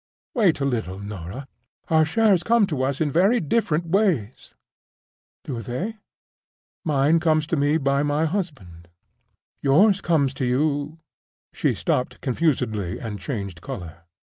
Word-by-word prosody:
"Wait 200 - +3
a 140 - 0
little, 110 -8 -2
Norah. 100 +5 -7 0.4
Our 160 -1 +4
shares 205 +1 +3
come 230 +3 +3
to 150 -8 -3
us 135 +2 -1
in 150 -2 +1
very 195 - +3
different 170 -2 0
ways." 165 - 0 0.9
"Do 130 -7 -5
they? 175 - -4 0.9
Mine 150 +1 +3
comes 155 -2 +2
to 165 - -1
me 145 +1 +2
by 140 -2 +1
my 145 +2 +1
husband. 135 - -5 0.7
Yours 190 +9 +4
comes 145 -6 +1
to - - +2
you—" 145 +4 0 0.6
She - - 0
stopped 125 - -1
confusedly, 115 - -1
and 105 -3 -6
changed 100 - -5
color. 85 -2 -8
145 Hz, 135 wpm, -23 LUFS, 120-165 Hz, 0.9 s, Our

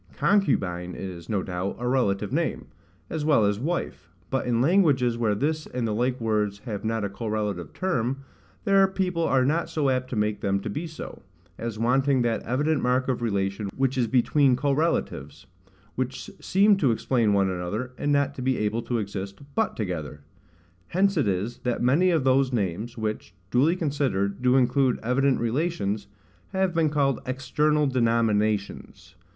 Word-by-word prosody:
CONCUBINE 95 - +1
is, 90 -3 -7
no 100 -3 0
doubt, 90 +1 -3
a 125 - -3
relative 120 -7 0
name, - - -1 0.4
as 160 -2 -3
well 150 -8 +4
as 100 0 0
wife: 170 +8 -3 0.2
but 135 -2 -1
in 120 -1 +1
languages 140 -6 +3
where 110 -3 +1
this 155 +7 -1
and 125 -2 -2
the 110 - -1
like 125 +3 0
words 105 -3 0
have 105 -5 -4
not 110 -1 -1
a - - -2
correlative 105 -3 -3
term, 135 -8 -1 0.4
there 195 -2 +5
people 185 -3 -1
are 135 -5 +2
not 160 +5 0
so 145 -4 +1
apt 130 0 -1
to 120 - -2
take 105 -1 -1
them 100 0 +1
to 105 - -4
be 160 +10 -4
so, 160 0 -9 0.4
as 115 -2 -4
wanting 130 +3 +2
that 115 -1 0
evident 145 +5 0
mark 125 +1 +1
of 125 -2 -1
relation 100 -2 -1
which 135 0 +1
is 125 -3 +1
between 130 +2 +3
correlatives, 135 - -1 0.5
which 130 0 -4
seem 200 +2 +4
to 145 -9 +2
explain 115 -1 +1
one 100 -1 +2
another, 95 +8 -3
and 145 +4 -1
not 140 0 +2
to 135 - -7
be 130 0 +1
able 105 +2 -1
to 120 +1 -2
exist, 100 -2 -5
but 220 - 0
together. 80 -8 -4 0.7
Hence 195 +2 +2
it 150 -9 +1
is, 100 +5 -2
that 125 -1 -2
many 150 +9 +4
of 165 -6 +2
those 130 0 +3
names, 110 +1 -2
which, 110 -4 -4 0.2
duly 145 +8 +3
considered, 135 - -1
do 125 0 +3
include 130 0 +3
evident 130 +3 +2
relations, 115 - -1 0.5
have 190 -2 +1
been 165 -2 +2
called 140 -3 +1
EXTERNAL 150 +4 +1
DENOMINATIONS. 115 -5 0
125 Hz, 170 wpm, -25 LUFS, 105-145 Hz, 0.7 s, there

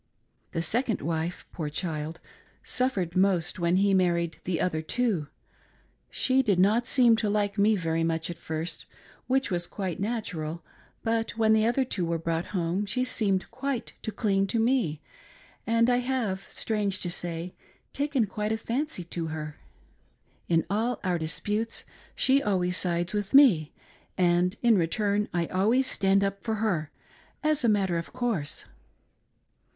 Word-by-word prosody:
The 165 - -1
second 230 +6 0
wife, 165 +2 -2
poor 155 -4 -4
child, 155 0 -3 0.4
suffered 200 -10 -1
most 185 -3 +2
when 170 +1 +2
he 195 +1 +3
married 170 -3 +1
the 175 -2 -1
other 160 -3 0
two. 195 -3 -1 0.8
She 260 0 +2
did 205 -8 +1
not 215 +6 +3
seem 245 -4 +5
to 215 -2 0
like 205 0 0
me 215 +2 +4
very 165 -3 -1
much 165 0 0
at 170 - -9
first, 160 +1 -5 0.4
which 265 -4 +1
was 175 -1 0
quite 190 -4 -4
natural, 175 -7 -3 0.4
but 225 0 -1
when 220 -1 +4
the 220 0 +3
other 255 +3 +2
two 200 -7 -1
were 170 0 0
brought 165 +1 -2
home 185 +1 -1
she 250 +5 0
seemed 205 -7 0
quite 260 0 -3
to 220 - -4
cling 195 -2 +1
to 225 +4 0
me, 225 - +1 0.7
and 230 +1 +3
I 245 0 +3
have, 245 -7 -2
strange 205 -3 -1
to 175 - +1
say, 175 0 -3 0.4
taken 280 -4 +1
quite 210 +1 -3
a 220 - 0
fancy 240 - -3
to 170 -1 -4
her. 155 -1 -6 0.9
In 165 -1 +3
all 225 +5 -1
our 180 -3 0
disputes 210 +8 -2 0.3
she 270 +1 +3
always 180 -4 +1
sides 175 0 +1
with 205 +4 -1
me, 195 - +6 0.5
and 180 +1 +2
in 230 -4 +5
return 205 +5 0
I 175 -1 0
always 215 +10 +2
stand 195 -4 +2
up 195 0 -2
for 220 -1 -1
her, 185 -9 -1 0.5
as 305 -2 +2
a 235 - +4
matter 190 -5 +2
of 165 - -8
course. 235 - -2
195 Hz, 155 wpm, -27 LUFS, 170-225 Hz, 0.9 s, me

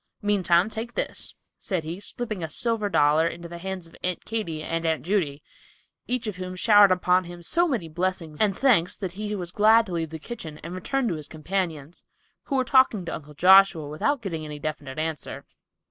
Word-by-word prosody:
Meantime 185 -3 +3
take 225 +2 -6
this," - - -4 0.2
said 185 -5 -2
he, 165 +4 -5
slipping 215 -2 -4
a 160 - -3
silver 220 +4 -1
dollar 155 -1 +4
into 170 +1 -6
the 170 0 -8
hands 190 -1 -5
of 165 - -14
Aunt 180 -1 -3
Katy 170 -9 -3
and 165 +1 -2
Aunt 160 -1 0
Judy, 160 -7 -1 0.6
each 250 -1 0
of 210 -4 -4
whom 185 0 -5
showered 205 0 +6
upon 180 0 +2
him 175 0 -10
so 340 - +2
many 235 - -2
blessings 165 -2 -3
and 205 -3 +2
"thankes" 220 -11 +3
that 190 -4 -5
he 210 +3 -4
was 180 -3 -5
glad 220 +3 +5
to 190 - -9
leave 165 -2 -2
the 160 - -6
kitchen 160 -4 -8
and 165 +2 -6
return 255 +8 -1
to - - -1
his 155 -2 -6
companions, 160 -2 -4 0.4
who 275 - -2
were 260 -1 +2
talking 255 -8 +4
to - - -4
Uncle 150 -1 -8
Joshua 185 -2 +6
without 235 - -1
getting 165 -6 -4
any 150 -1 -6
definite 145 -2 -5
answer. 155 -1 -4
180 Hz, 200 wpm, -25 LUFS, 160-210 Hz, 0.6 s, showered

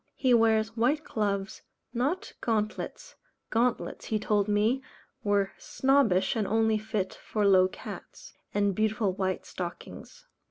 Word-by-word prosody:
He 255 -2 +3
wears 225 -1 +3
white 265 +7 +2
gloves, 200 -4 -2 0.3
not 295 - -1
gauntlets 225 - -2 0.4
gauntlets, 235 +2 0
he 220 - 0
told 210 -1 +1
me, 215 +5 +2 0.4
were 200 -1 +2
snobbish, 260 -10 +2
and 215 -3 0
only 220 0 +2
fit 215 -3 -2
for 210 -2 -2
low 185 -2 +6
cats - - -10 0.2
and 205 -1 +1
beautiful 215 -1 +1
white 190 -1 -2
stockings. 180 - -8
215 Hz, 125 wpm, -28 LUFS, 200-235 Hz, 0.4 s, low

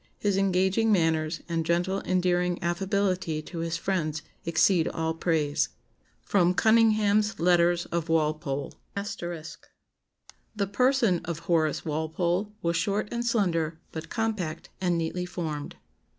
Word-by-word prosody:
His 205 -2 0
engaging 195 +3 +2
manners 160 -3 +1
and 165 -1 -1
gentle 175 +4 0
endearing 180 -1 +1
affability 185 -2 0
to 170 +1 -7
his 165 0 -2
friends 160 -4 -2 0.2
exceed 165 +1 +3
all 160 0 -1
praise." 160 -3 0 0.6
[Sidenote: 180 -2 +3
Cunningham's 215 -2 +3
Letters 175 0 +3
of 170 -1 -2
Walpole. 150 -3 0
*] - - -41 1.6
"The 200 - +1
person 245 -6 +3
of 170 -2 -4
Horace 160 -3 +1
Walpole 170 +6 -1
was 170 0 +1
short 200 +5 0
and 235 0 -2
slender, 170 -9 0
but 160 0 -7
compact, 195 -8 -2
and 175 -2 +1
neatly 175 +2 -2
formed. 155 -5 -4
175 Hz, 120 wpm, -27 LUFS, 160-195 Hz, 1.6 s, exceed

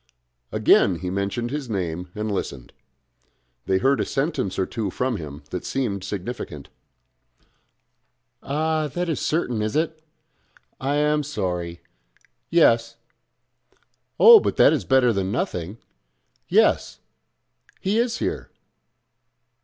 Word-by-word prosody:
Again 95 - +4
he 90 +2 -5
mentioned 100 +5 -2
his 145 -3 -4
name 90 -3 -3
and 105 0 -3
listened. 70 -10 -5 0.9
They 95 - +3
heard 135 +8 +2
a - - +2
sentence 135 - -2
or 95 - +1
two 110 -1 -3
from 125 +4 -2
him 75 -2 -8
that 90 - -4
seemed 105 -8 -2
significant. 100 - -6 1.7
"Ah! 155 +2 -1
that 175 +5 -3
is 160 - -1
certain, 125 -9 -1
is 105 0 -2
it? 160 0 -1 0.8
I 140 +2 -1
am 150 +1 +2
sorry.... 90 - -4 0.7
Yes.... 115 -9 +3 1.2
Oh! 460 -1 +10
but - - -2
that - - +6
is - - -1
better 130 -3 +4
than 95 -1 -1
nothing.... 95 -3 -3 0.7
Yes; - - +2 0.8
he 200 +4 0
is 235 0 0
here.... - - -3
115 Hz, 120 wpm, -23 LUFS, 95-150 Hz, 1.7 s, Oh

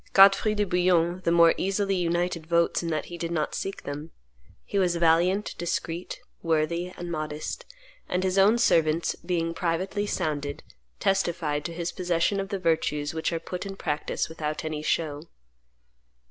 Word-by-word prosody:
Godfrey 195 +2 +6
de 210 - +2
Bouillon 180 -1 +2
the 170 - +3
more 170 -1 +6
easily 195 +1 0
united 175 -2 -1
votes 170 0 +2
in 170 - -3
that 155 -2 -1
he 175 0 -8
did 170 - -2
not 160 -3 -1
seek 195 - -4
them. 145 +3 -6 0.6
He 200 - -1
was 180 -2 +2
valiant, 170 +4 +3
discreet, 170 0 -3 0.2
worthy, 165 +2 0
and 175 0 -5
modest; 155 - -4 0.4
and 180 +1 0
his 190 +1 +2
own 210 +4 +6
servants, 165 -7 +3
being 170 -1 -1
privately 185 +5 -1
sounded, 145 -5 -2 0.4
testified 170 -6 0
to 170 - -3
his 170 0 -2
possession 180 +2 0
of 195 0 -3
the 200 - -2
virtues 160 -4 0
which 160 +1 -1
are 165 - -1
put 180 +2 -5
in 195 -1 -6
practice 150 -5 -2
without 155 -1 -4
any 155 -1 -3
show. 155 0 -1
170 Hz, 160 wpm, -27 LUFS, 160-185 Hz, 0.6 s, Godfrey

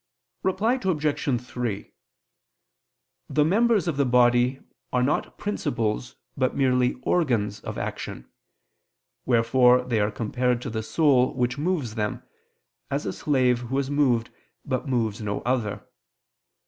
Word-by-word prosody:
Reply 220 +7 +1
Obj. 150 -7 0
3: 120 -4 -5 1.4
The 150 -1 +2
members 215 +2 +3
of 160 -5 -1
the 140 - +3
body 125 +1 +3 0.3
are 125 0 +2
not 140 - -1
principles 125 - -2 0.2
but 130 -1 0
merely 125 -2 +2
organs 120 - +1
of - - -7
action: - - -5 1.0
wherefore 125 +1 +4
they 120 -3 0
are 105 0 +2
compared 120 +3 -1
to - - -4
the 110 0 -2
soul 130 0 +2
which 125 +1 -1
moves 150 -8 -1
them, 105 -2 -3 0.7
as 140 +2 -2
a - - -2
slave 130 -4 +2
who 125 +2 -3
is 140 0 -1
moved 130 -6 +2 0.3
but 130 +1 -2
moves 115 -3 0
no 105 -1 -3
other. 120 -5 -2
125 Hz, 130 wpm, -25 LUFS, 120-145 Hz, 1.4 s, wherefore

